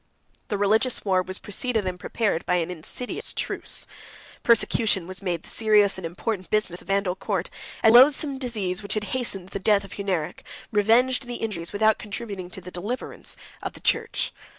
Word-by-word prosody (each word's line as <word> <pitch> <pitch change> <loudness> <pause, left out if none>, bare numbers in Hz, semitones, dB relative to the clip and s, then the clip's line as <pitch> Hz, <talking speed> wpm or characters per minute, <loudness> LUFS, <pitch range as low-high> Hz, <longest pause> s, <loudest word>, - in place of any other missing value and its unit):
The 205 - -1
religious 220 +5 +2
war 185 -2 +3
was 185 +1 0
preceded 220 +1 -1
and 180 -1 -3
prepared 210 -6 -1
by 180 - +3
an 175 0 0
insidious 180 +9 -2
truce; - - -2 0.6
persecution 225 -5 +3
was 185 +1 -6
made 175 -4 -2
the - - -12
serious 210 -3 +3
and 170 - -4
important 185 +2 -4
business 210 -5 0
of - - -18
the - - -2
Vandal 195 -2 +1
court; 190 -2 -2 0.3
and 220 - +7
the 240 - +11
loathsome 275 0 +3
disease 210 -7 -1
which 200 0 -3
hastened 205 -3 -2
the 200 - -4
death 200 0 +3
of 195 - -10
Hunneric, 185 -6 -2 0.3
revenged 240 +5 +3
the 245 - -4
injuries, 195 -8 -3
without 215 +1 +3
contributing 200 -3 -5
to 190 - -5
the 180 +1 -9
deliverance, 205 +9 -5 0.2
of - - -4
the - - -12
church. - - 0
200 Hz, 180 wpm, -25 LUFS, 185-225 Hz, 0.6 s, the